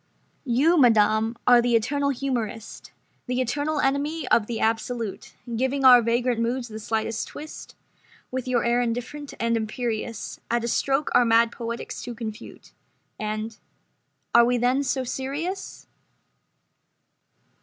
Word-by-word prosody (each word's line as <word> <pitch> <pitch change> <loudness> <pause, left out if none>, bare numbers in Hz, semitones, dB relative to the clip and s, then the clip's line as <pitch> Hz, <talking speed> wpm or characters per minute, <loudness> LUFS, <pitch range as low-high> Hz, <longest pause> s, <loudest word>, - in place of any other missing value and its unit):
"You, 295 +8 +3
madam, 220 -2 +4
are 245 -1 +7
the 240 0 +2
eternal 280 +5 +1
humorist 240 -5 -4 0.4
The 250 0 -1
eternal 290 +5 -1
enemy 285 +2 0
of 210 -3 +3
the 235 -2 -3
absolute, 225 -1 -2 0.2
Giving 265 +3 0
our 250 -2 +9
vagrant 235 +1 0
moods 240 +1 -1
the 220 0 -7
slightest 220 0 -2
twist 310 +1 -10 0.6
With 260 0 -4
your 245 -2 +1
air 240 +1 +2
indifferent 245 +5 -4
and 230 0 +1
imperious 225 0 -3
At 235 0 0
a - - -1
stroke 275 +4 0
our - - +6
mad 230 0 +4
poetics 235 0 -6
to 240 -1 -6
confute—" 220 -2 -8 0.5
And—"Are 215 +2 -2
we 245 +1 +2
then 250 +3 +2
so 270 -1 -1
serious?" 290 +10 -4
240 Hz, 130 wpm, -25 LUFS, 230-265 Hz, 0.6 s, our